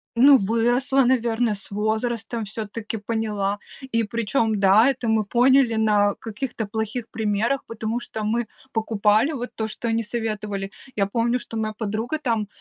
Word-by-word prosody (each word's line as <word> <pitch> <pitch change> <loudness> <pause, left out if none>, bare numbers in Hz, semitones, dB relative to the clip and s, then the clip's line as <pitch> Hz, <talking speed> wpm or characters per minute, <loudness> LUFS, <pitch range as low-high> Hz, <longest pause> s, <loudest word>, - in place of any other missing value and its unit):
Ну, 270 +3 +8
выросла, 240 +6 +2
наверное, 235 -3 +2
с 195 - -7
возрастом 220 +2 -1
всё-таки 220 +1 -5
поняла. 205 -2 -2 0.3
И 230 0 +2
причём 225 0 0
да, 200 +5 +6
это 250 -3 -2
мы 220 -1 +3
поняли 250 +2 +4
на 210 -2 +3
каких-то 225 0 -5
плохих 220 +3 -3
примерах, 220 +4 0
потому 230 +1 -3
что 220 -2 -6
мы 230 +2 0 0.3
покупали 220 +4 +2
вот 245 -2 -4
то, 220 -1 -2
что 225 +2 -5
они 225 0 +1
советовали. 210 -3 -3 0.2
Я 200 -2 +2
помню, 235 +4 +1
что 225 - -7
моя 215 -1 -2
подруга 220 +6 -2
там, 230 -7 -1
225 Hz, 150 wpm, -23 LUFS, 210-235 Hz, 0.3 s, Ну